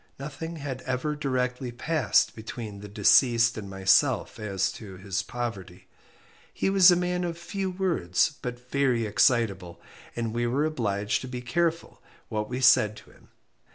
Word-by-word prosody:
Nothing 155 +4 -6
had 140 -4 -6
ever 130 +4 -1
directly 125 -3 -2
passed 150 +4 +1
between 110 -2 -7
the 105 - -9
deceased 115 +3 +4
and 100 -3 -7
myself 95 0 +2
as 100 -3 -1
to 100 -4 -10
his 100 +2 -3
poverty. 100 -6 -6 0.7
He 195 - -1
was 190 -2 +7
a 175 - +6
man 180 0 -1
of 170 -1 -3
few 190 +3 -4
words, 175 - 0
but 125 0 -7
very 130 -5 +1
excitable, 105 -5 +1 0.4
and 115 -2 -3
we 120 0 0
were 135 +5 +1
obliged 105 -9 -1
to 130 - -7
be 125 -1 -6
careful 165 +7 -2 0.3
what 105 -1 -3
we 125 +1 -3
said 110 -4 +5
to - - -15
him. - - -22
120 Hz, 155 wpm, -27 LUFS, 105-150 Hz, 0.7 s, was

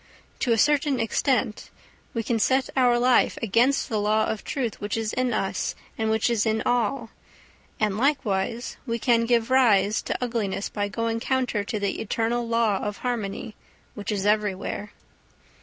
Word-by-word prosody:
To 245 - 0
a 230 - +4
certain 290 0 +2
extent 225 -1 0 0.5
we 230 - -1
can 230 0 0
set 260 +4 +2
our 250 -2 +4
life 250 +1 +3
against 235 +6 +2
the 220 -4 -1
law 215 +1 +2
of 220 - -3
truth 250 -6 -3
which 205 +2 -2
is 220 -1 -2
in 255 0 0
us 195 -3 -1 0.2
and 220 0 -1
which 220 0 +2
is 235 -3 +1
in 220 -1 0
all, 240 0 0 0.7
and 210 -1 0
likewise 240 -5 0
we 230 0 -1
can 230 0 +2
give 235 0 +2
rise 220 -5 +4
to - - -3
ugliness 225 -5 -2
by 205 -1 -2
going 230 +2 -2
counter 250 -4 0
to 215 0 -3
the 200 -1 -2
eternal 230 +2 -1
law 230 -4 +2
of 205 -1 -4
harmony 220 -3 -3 0.4
which 205 -1 -5
is 200 -2 -2
everywhere. 210 -1 -1
225 Hz, 165 wpm, -25 LUFS, 210-245 Hz, 0.7 s, a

